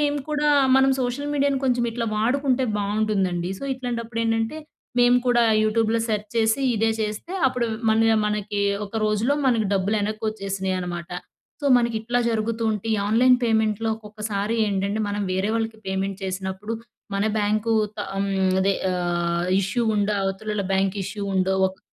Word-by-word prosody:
మేము 290 0 +1
కూడా, 300 0 +1 0.3
మనం 265 0 +5
సోషల్ 255 +4 -2
మీడియాను 280 -1 +2
కొంచెం, 245 -2 +2
ఇట్లా 230 0 -3
వాడుకుంటే 260 +4 +1 0.2
బాగుంటుందండి. 200 -4 0
సో, - - -7
ఇట్లాంటప్పుడు 235 -3 -4
ఏంటంటే, 225 +5 0 0.4
మేము 245 0 +5
కూడా 240 -1 +4 0.2
యూట్యూబ్‌లో 225 +1 +2
సెర్చ్ 210 -1 -2
చేసి, 225 +3 +2
ఇదే 225 +1 +2
చేస్తే 215 - -4 0.2
అప్పుడు 250 -2 -1 0.2
మళ్ళీ 225 +1 +3
ఆహ్, 215 - +2
మనకి 210 -1 -2 0.3
ఒక 200 - -17
రోజులో 215 +6 +1
మనకి, 230 -4 +2
డబ్బులు 200 +3 +1
ఎనక్కోచ్చేసినయి, 200 -3 -2
అనమాట. 175 -1 -5 0.5
సో, 290 - -1
మనకి 235 -2 +1
ఇట్లా, 240 +2 -1
జరుగుతూ 230 +1 -1
ఉంటే, 210 0 -5
ఈ - - +1
ఆన్లైన్ 250 +4 +5
పేమెంట్‌లో 220 -1 +1
ఒక్కొక్కసారి 210 0 -3
ఏంటంటే, 200 +1 -1
మనం 205 0 -2
వేరే 190 +2 0
వాళ్ళకి, 225 -1 -3
పేమెంట్ 190 0 -2
చేసినప్పుడు 190 +3 -4 0.4
మన 200 +2 +1
బ్యాంకు 215 +2 0 0.3
త - - -14 0.2
అమ్ 200 0 0 0.3
అదే 195 0 +2 0.2
ఆహ్, 175 -1 -1
ఇష్యూ 195 +5 -1
ఉండో, 210 0 +1
అవతలోళ్ళ, 200 +1 -2
బ్యాంక్ 195 +1 +1
ఇష్యూ 200 +2 -5
ఉండో 190 0 +2 0.2
ఒక 190 - -14
215 Hz, 155 wpm, -23 LUFS, 195-235 Hz, 0.5 s, మనం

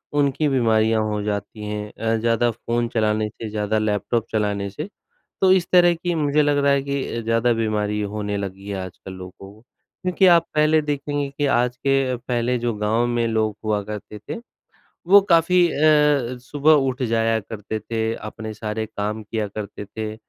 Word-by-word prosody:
उनकी 145 +1 +2
बीमारियाँ 110 -4 +2
हो 105 -1 -2
जाती 105 +1 -4
हैं 105 0 -5
अ, 115 0 -1
ज़्यादा 115 +1 +1
फ़ोन 120 +1 -2
चलाने 110 -1 0
से, 110 +1 -8
ज़्यादा 105 0 -1
लैपटॉप 110 +2 0
चलाने 105 -2 -1
से, 100 - -6 0.5
तो 190 -1 +5
इस 185 -2 +3
तरह 175 -1 +6
की 175 +1 -3
मुझे 150 -1 +2
लग 145 -1 +2
रहा 140 0 +3
है 140 -1 +1
कि 140 -1 -2
अ, - - -2
ज़्यादा 115 +1 +2
बीमारी 105 -2 -1
होने 105 0 -3
लगी 100 0 -6
है 100 - -3
आजकल 95 +1 -10
लोगों 95 0 -9 0.2
को। 110 - -20 0.4
क्योंकि 185 +1 +3
आप 170 -2 +6
पहले 155 +1 +4
देखेंगे 145 -1 -2
कि 145 - +1
आज 125 0 0
के 135 -1 +1
पहले 120 0 -1
जो 120 0 -1
गाँव 110 +3 +1
में 120 -1 0
लोग 110 -2 0
हुआ 105 -1 +1
करते 105 0 -7
थे 110 - -6 0.7
वो 200 +2 +8
काफ़ी 175 +1 +5
अ, 150 -4 +3
सुबह 145 +5 +2 0.2
उठ 130 0 -5
जाया 115 -1 +1
करते 110 +1 -6
थे, 110 +1 -2
अपने 110 0 -7
सारे 110 +1 -4
काम 105 0 -4
किया 105 0 -3
करते 105 0 -7
थे 110 +1 -6
115 Hz, 180 wpm, -22 LUFS, 105-140 Hz, 0.7 s, वो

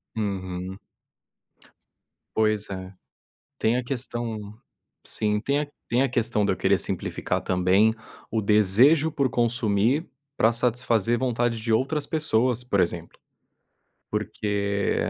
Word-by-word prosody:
Uhum. 95 -2 -4 1.6
Pois 110 -1 +1
é, 95 -1 -6 0.7
tem 115 +2 +2
a 125 - -1
questão 120 -3 -2 0.7
sim, 105 -1 +1
tem 140 +5 0
a 150 - -2 0.2
tem 120 - +1
a 135 - +1
questão 115 -3 0
de 100 - +1
eu 95 - -3
querer 95 +1 +2
simplificar 95 -3 -2
também 95 +4 +3 0.4
o 110 - 0
desejo 110 - +4
por 140 -4 +1
consumir 120 - +1 0.3
pra 110 - +5
satisfazer 120 -1 +1
vontade 120 -2 0
de 115 0 -3
outras 140 +6 0
pessoas, 125 -6 +1
por 100 -6 +1
exemplo. 85 -1 -2 0.9
Porque 100 -1 -1
110 Hz, 120 wpm, -25 LUFS, 100-125 Hz, 1.6 s, pra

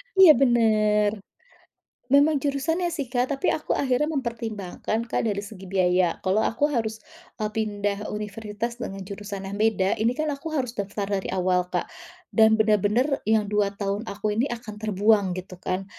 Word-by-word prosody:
Iya 380 -4 +9
benar. 215 -4 +3 1.0
Memang 285 +2 +4
jurusannya 305 +6 0
sih, 325 -4 -3
Kak, 245 0 +1
tapi - - +1
aku 310 - -1
akhirnya 275 +2 +1
mempertimbangkan, 230 - -3
Kak, 230 0 -1
dari 200 -1 -2
segi 195 -3 -10
biaya. 180 -2 +2
Kalau 190 +3 +2
aku 225 +5 0
harus, 220 -3 -2 0.3
eee, 215 -1 -2
pindah 205 -1 -2
universitas 210 +3 -5
dengan 195 -4 -5
jurusan 200 0 -7
yang 200 +2 -5
beda, 205 -3 +2
ini 235 +3 +1
kan 305 -1 -1
aku 285 +3 -6
harus 250 -3 -1
daftar 200 -2 -3 0.2
dari - - -7
awal, 180 -1 +1
Kak. - - -1 0.5
Dan 220 -1 +5
benar-benar 220 +6 +2
yang 220 -1 +3
2 205 -1 0
tahun 200 +2 -3
aku 210 +1 -2
ini 235 +7 0
akan 230 -3 -6
terbuang 205 -2 +2
gitu 185 0 -8
kan. 185 +1 -2
215 Hz, 160 wpm, -25 LUFS, 200-240 Hz, 1.0 s, Iya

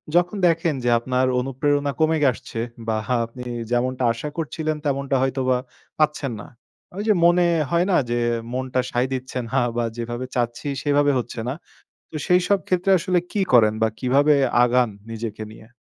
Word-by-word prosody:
যখন 175 +3 +3
দেখেন 165 -1 +1
যে 120 - +1
আপনার 125 +1 0
অনুপ্রেরণা 140 +2 0
কমে 160 0 +3
আসছে 115 0 -8 0.3
বা 110 - +1 0.3
আপনি 120 +2 -10 0.3
যেমনটা 125 +1 0
আশা 120 +6 -5
করছিলেন, 155 -1 -2
তেমনটা 140 -1 0
হয়তোবা 130 -1 +1 0.4
পাচ্ছেন 150 -3 +1
না। - - -11 0.5
ওই 205 - -2
যে 215 - +5
মনে 175 +1 +5 0.3
হয় 170 +1 +3
না? - - +4
যে, 120 - 0 0.4
মনটা 130 0 -1
সায় 125 +2 +1
দিচ্ছে 130 0 -5
না 130 - -1 0.2
বা 120 - +1
যেভাবে 120 +2 -4
চাচ্ছি 120 +3 -2 0.2
সেভাবে 145 0 +3
হচ্ছে 120 -1 -6
না। 130 - -1 0.6
তো 155 - -6
সেইসব 180 +2 +3
ক্ষেত্রে 185 +1 +1
আসলে 180 +1 +1
কি 205 - 0
করেন 110 -3 +5
বা 110 - +4
কিভাবে 140 +4 +3 0.3
আগান, 125 -1 +2 0.2
নিজেকে 110 -1 -5
নিয়ে? 110 0 -15
130 Hz, 165 wpm, -22 LUFS, 120-155 Hz, 0.6 s, যে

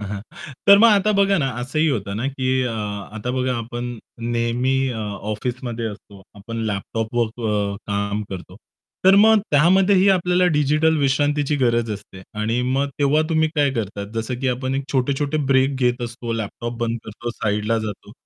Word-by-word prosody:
हां, 105 - -5
हां. 140 - -9
तर 200 0 +9
मग 230 - +7
आता 210 -1 +4
बघा 200 0 +3
ना, 135 -3 0
असंही 155 +6 0
होतं 100 -8 -2
ना, 120 +5 -2
की 130 -1 -3
अ, 125 - -1 0.5
आता 110 +3 -3
बघा 130 0 0
आपण 120 +1 -5 0.4
नेहमी 120 +3 +1 0.2
अ, 110 - -5 0.3
ऑफिसमध्ये 120 +1 -4
असतो 100 -2 -10
आपण 115 +3 -8
लॅपटॉपवर 110 +4 -1 0.2
अ, 100 -1 0
काम 100 +1 -1
करतो. 90 0 -8 0.5
तर 190 - +7
मग 220 -1 +6
त्यामध्येही 185 +6 +4
आपल्याला 180 -1 +3
डिजिटल 155 +2 +3
विश्रांतीची 145 +1 +1
गरज 120 -3 +1
असते. 100 -2 -10 0.2
आणि 115 +3 0
मग 140 +1 +1
तेव्हा 145 +2 +3
तुम्ही 160 -1 +2
काय 145 -2 +3
करता? 105 -4 -4
जसं 115 +3 -2
की 130 - 0
आपण 130 +1 -2
एक 135 0 -2
छोटे-छोटे 140 +3 0
ब्रेक 135 0 +3
घेत 125 0 +1
असतो, 120 0 -5
लॅपटॉप 115 +2 -4
बंद 115 0 -1
करतो, 115 +2 -6
साइडला 105 0 -1
जातो. 110 -2 -6
125 Hz, 170 wpm, -21 LUFS, 110-145 Hz, 0.5 s, तर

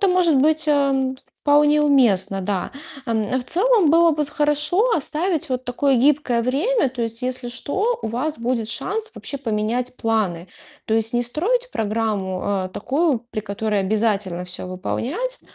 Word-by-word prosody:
Это 395 - +3
может 360 -4 +3
быть, 310 +3 +3
э, 275 -3 +2 0.3
вполне 295 +1 +4
уместно, 205 -9 +3
да. 190 -1 -2 0.3
Э, 220 0 -1
в 250 - -6
целом 390 - +3
было 335 +1 +5
бы 300 0 0
хорошо 300 - +1
оставить 320 +1 -1
вот 255 0 -2
такое 265 +2 +1
гибкое 265 -2 +2
время. 285 - +1
То 245 -1 -5
есть 230 +1 -4
если 250 -1 -3
что, 400 - -1
у - - -2
вас 255 +7 -2
будет 230 -2 -1
шанс 430 - -3
вообще 280 - -4
поменять 235 +1 -2
планы. 205 -7 -1 0.4
То 220 - 0
есть 225 +1 0
не 240 - +2
строить 450 - 0
программу, 210 -4 -1
э, 195 -2 -1
такую, 280 - 0
при 215 - -3
которой 210 0 -2
обязательно 195 -3 0
всё 180 0 -5
выполнять. 290 - -3
255 Hz, 160 wpm, -21 LUFS, 220-300 Hz, 0.4 s, было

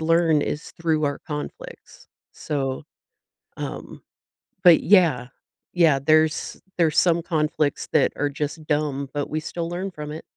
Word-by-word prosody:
learn 165 -2 +3
is 150 - -4
through 160 -2 +1
our 145 -1 -2
conflicts, 475 - -8 0.2
so, 135 -3 -3 0.8
um - - -7 0.6
but 175 -3 +7
yeah, 165 -11 +4 0.5
yeah, 160 -6 +4
there's 155 +2 +1 0.2
there's 165 -3 +2
some 170 -1 +3
conflicts 155 -3 -1
that 155 - +3
are 145 - -1
just 150 +2 -5
dumb, 145 -2 -1
but 145 -1 -3
we 155 - -2
still 165 +1 -4
learn 185 +3 -4
from 150 -3 -7
it. 155 - -7
155 Hz, 140 wpm, -23 LUFS, 145-170 Hz, 0.8 s, but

